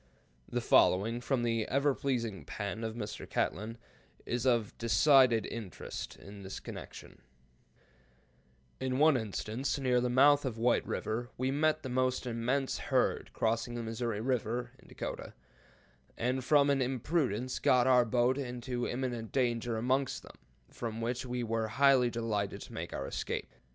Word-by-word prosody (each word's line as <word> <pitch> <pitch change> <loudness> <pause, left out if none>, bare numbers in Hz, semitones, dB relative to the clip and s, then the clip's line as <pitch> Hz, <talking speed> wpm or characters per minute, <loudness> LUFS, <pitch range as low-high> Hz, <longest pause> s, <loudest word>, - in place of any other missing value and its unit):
] 60 - -36
The - - -1
following, 115 +6 +3
from 125 -1 0
the 115 -2 0
ever 140 +2 +2
pleasing 115 - -2
pen 105 +7 -5
of 110 0 -3
Mr. 105 -3 -6
Catlin, 110 +3 -2 0.5
is 120 +2 -1
of 115 -4 +1
decided 125 -1 +5
interest 110 -6 -6
in 100 +1 -12
this 95 0 -6
connection: - - -10 1.6
"In 130 -1 -1
one 155 +1 +5
instance, 110 +3 -2
near 125 -3 +2
the 125 - 0
mouth 140 +3 +5
of 125 -5 -3
White 120 +2 +2
River, 120 +3 -3
we 130 +1 0
met 155 +2 +1
the 130 - -4
most 130 +1 0
immense 125 +3 -1
herd - - +1
crossing 115 +2 0
the 120 - -3
Missouri 115 -1 -3
River 120 0 -1
[in - - -19
Dakota], - - -6 0.8
and 125 +2 -1
from 145 +1 +4
an 135 -1 +2
imprudence 130 - -1
got 125 -1 +4
our 125 -2 +6
boat 125 +3 +2
into 125 -1 -3
imminent 120 -3 -3
danger 120 -3 0
amongst 130 +4 0
them, - - -14 0.3
from 115 -2 -5
which 120 +2 -2
we 125 0 -2
were 115 -1 -1
highly 130 +2 +4
delighted 110 -4 -2
to - - -10
make - - -5
our 70 - -4
escape. - - -4
120 Hz, 155 wpm, -32 LUFS, 115-130 Hz, 1.6 s, our